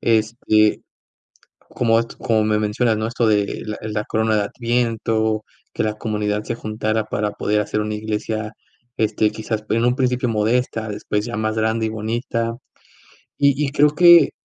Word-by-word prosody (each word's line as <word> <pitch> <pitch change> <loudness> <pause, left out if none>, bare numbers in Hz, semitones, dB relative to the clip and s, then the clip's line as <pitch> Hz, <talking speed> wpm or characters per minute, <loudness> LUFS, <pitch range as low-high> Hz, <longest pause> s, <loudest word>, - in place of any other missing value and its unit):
Este, 110 -1 +2 0.9
como 115 -2 +2
at 115 0 -2
como 110 -2 +1
me 105 0 +2
mencionas, 110 +2 +1
¿no?, 110 - -1
esto 115 0 0
de, 105 -2 +3
eh, 100 - -5 0.3
la 105 0 -2
corona 110 0 +1
de 105 - +2
Adviento, 115 -2 0 0.3
que - - -1
la 110 0 -1
comunidad 105 -1 -2
se 115 - -3
juntara 110 0 -2
para 105 -1 -2
poder 105 0 0
hacer 105 - -1
una 105 0 -3
iglesia, 110 0 -3 0.4
este, 110 0 +1
quizás 110 0 -4
p 110 - -1
en 115 - +1
un 125 +1 +2
principio 125 -1 0
modesta, 110 +1 0
después 105 0 -3
ya 120 -2 -4
más 110 0 -1
grande 110 +1 0
y - - -2
bonita. 115 +1 -2 0.8
Y 140 0 +5 0.2
y 140 - -3
creo 150 0 +5
que 175 -1 +8
110 Hz, 170 wpm, -21 LUFS, 105-115 Hz, 0.9 s, que